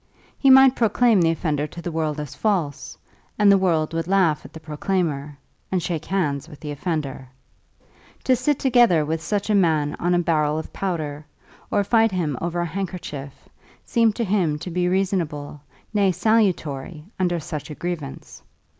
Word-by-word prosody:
He 275 - +4
might 265 0 +8
proclaim 225 -2 +3
the 165 - +3
offender 155 -3 -1
to 170 - -11
the 170 0 -5
world 155 -2 -2
as 150 -3 -6
false, 180 -10 -2 0.4
and 205 -1 +6
the 200 - +6
world 165 -4 +1
would 165 0 -2
laugh 180 -6 +2
at - - -12
the 160 - -10
proclaimer, 150 -2 -2 0.3
and 185 -3 0
shake 165 -4 -3
hands 155 -6 -1
with 150 - -12
the 150 -2 -6
offender. 145 -4 -3 1.0
To 260 - +3
sit 255 +4 0
together 235 - +4
with 160 +1 -2
such 205 +5 -1
a - - +3
man 160 -7 +2
on 175 +1 +1
a - - +3
barrel 155 -3 +1
of 160 - -6
powder, 155 -6 -3 0.5
or 205 - +2
fight 225 +1 +3
him 165 -7 -1
over 175 +1 -2
a - - -1
handkerchief, 170 -6 -6 0.4
seemed 230 -3 +2
to 235 - -1
him 185 -7 +1
to 175 +4 -7
be 180 +1 0
reasonable, 175 -7 -1 0.3
nay 200 -2 +3
salutary, 175 -7 0
under 175 -2 +1
such 150 0 -6
a 150 - -7
grievance. 160 -6 -6
170 Hz, 170 wpm, -23 LUFS, 150-195 Hz, 1.0 s, might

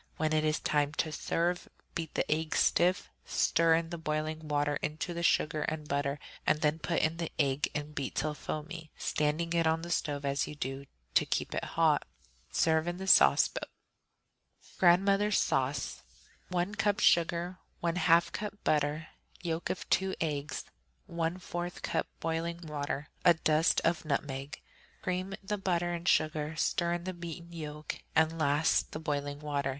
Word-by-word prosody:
When 155 0 +1
it 155 0 +3
is 155 0 +1
time 145 -1 +1
to 155 0 -1
serve, 175 +3 -1 0.2
beat 165 -2 -4
the - - +1
egg 155 +1 0
stiff, 180 +1 +3
stir 165 0 +3
the 165 0 -7
boiling 155 0 -2
water 145 0 +1
into 155 +3 -3
the 170 - -3
sugar 155 -2 +2
and 155 -1 -3
butter, 140 0 0 0.3
and 155 - +3
then 155 0 +2
put 170 +1 0
in 160 +1 +1
the 165 -1 -3
egg 140 -1 +1
and 150 0 -4
beat 140 -2 -4
till 150 +2 0
foamy, 155 +2 -6
standing 155 +3 0
it 165 -1 +3
on 160 +1 +1
the 170 - -5
stove 145 -4 -1
as 140 0 0
you 150 - -7
do 135 0 -4
so, - - -37 0.2
to - - +4
keep - - -1
it - - -2
hot. - - +2 0.4
Serve 160 0 +2
in 175 0 -2
the 190 - -5
sauce 190 - +7
boat. - - -6 1.1
Grandmother's 195 +3 +4
Sauce 135 0 0 0.5
1 180 +2 -1
cup 205 -1 +1
sugar. 170 +2 +3 0.2
1/2 170 0 +3
cup 210 0 -4
butter. 150 +1 +1 0.3
Yolks 165 -1 -2
of 185 - -5
two 190 0 +2
eggs. 150 -2 -2 0.4
1/4 175 +1 -3
cup - - -1
boiling 165 +1 -2
water. 145 -2 -3 0.2
A 175 - +7
dusting 160 +1 +2
of 165 0 +1
nutmeg. 140 -1 -3 0.4
Cream 185 +2 -2
the 205 +1 -2
butter 175 -2 0
and 170 +1 -5
sugar, 155 -1 +2
stir 170 +2 +1
in 175 0 -3
the 185 +1 -4
beaten 170 0 -8
yolk, 150 -2 -6 0.2
and 160 +1 +3
last 150 +1 +2
the 155 - -4
boiling 145 -2 -2
water. 145 -2 -1
160 Hz, 165 wpm, -31 LUFS, 150-175 Hz, 1.1 s, sauce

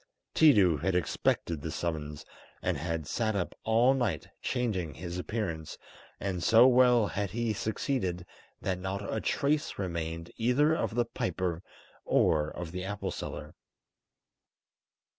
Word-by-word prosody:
Tiidu 100 - +6
had 95 +1 0
expected 85 -2 0
this 80 +1 -4
summons, 75 -3 -4 0.4
and - - +1
had 80 +1 -3
sat 110 +6 -1
up 95 -3 -2
all 115 +4 +4
night 120 -12 -1
changing 100 - -1
his 85 +4 -5
appearance, 90 -6 -4 0.4
and 95 -2 -2
so 115 +2 +7
well 125 -3 +5
had 100 -1 -2
he 115 +2 -1
succeeded 100 -5 -2 0.4
that 95 -1 -1
not 95 +2 -3
a 110 - -1
trace 145 +1 0
remained 85 -3 -4
either 125 +7 +3
of 115 - -1
the 120 -1 +2
piper 90 -6 -2 0.4
or 75 -1 +2
of 85 -1 -6
the 90 +1 -4
apple 100 +1 -3
seller. 75 +1 -6
95 Hz, 135 wpm, -30 LUFS, 85-115 Hz, 0.4 s, so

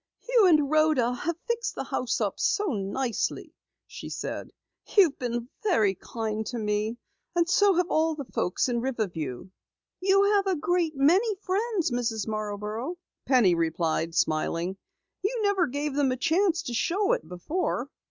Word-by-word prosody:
"You 475 -5 +5
and 305 -5 +4
Rhoda 310 -6 +3
have 315 +6 -3
fixed 470 0 -2
the - - -3
house 250 - -2
up - - -2
so 405 -8 +1
nicely," 220 +4 -2 0.3
she - - -9
said. - - -5 0.5
"You've 355 -8 +5
been 240 -2 -3
very 280 - +3
kind 220 +2 -4
to 245 - -4
me, 210 +1 -1 0.4
and 340 -1 +3
so 395 +2 +4
have 355 0 +2
all 320 0 +2
the 285 -2 -6
folks 195 -1 -1
in 240 -2 0
Riverview." 185 - -3 0.5
"You 390 +1 +4
have 400 -1 +3
a 380 - +2
great 335 0 0
many 370 +11 +3
friends, 390 - -1
Mrs. 225 -3 -1
Marborough," 215 - -4 0.3
Penny 245 -9 +5
replied, 165 0 -1
smiling. 170 +2 0 0.5
"You 440 +6 -1
never 395 -4 +2
gave 285 +2 -3
them 280 -2 +2
a 255 - -1
chance 345 +5 +2
to 245 - -5
show 390 - +1
it - - -3
before." 250 - -2
275 Hz, 155 wpm, -27 LUFS, -, 0.5 s, You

